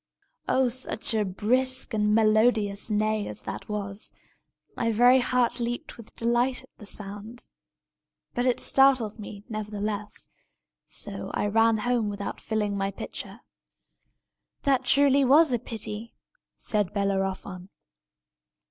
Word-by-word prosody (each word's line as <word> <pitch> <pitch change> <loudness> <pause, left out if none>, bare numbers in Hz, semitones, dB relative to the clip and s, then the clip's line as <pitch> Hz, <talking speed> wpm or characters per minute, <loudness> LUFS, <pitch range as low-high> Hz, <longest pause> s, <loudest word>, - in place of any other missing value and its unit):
Oh, 260 -1 +3
such 240 -2 -2
a 215 -1 +2
brisk 250 +7 +2
and 210 -1 +2
melodious 215 -1 +2
neigh 215 0 0
as 105 0 -6
that - - -7
was! 200 -1 -4 0.6
My 230 -1 0
very 245 +4 +6
heart 245 -1 +1
leaped 240 0 -4
with 230 -2 -14
delight 240 +2 +1
at - - -19
the 210 - -7
sound. 210 +4 -7 0.9
But 245 +1 0
it 250 - +2
startled 260 -6 +3
me, 205 -1 -9
nevertheless; 210 -1 -4 0.6
so - - -5
that - - -4
I - - 0
ran 225 +2 +3
home 235 -1 0
without 200 0 -5
filling 210 -2 -1
my 195 0 -1
pitcher." - - -7 1.2
"That 270 -2 +3
was - - -6
truly 280 0 +5
a 275 -1 +5
pity!" 220 0 -5 0.4
said 210 -5 -1
Bellerophon. 195 -2 -2
220 Hz, 130 wpm, -26 LUFS, 205-245 Hz, 1.2 s, very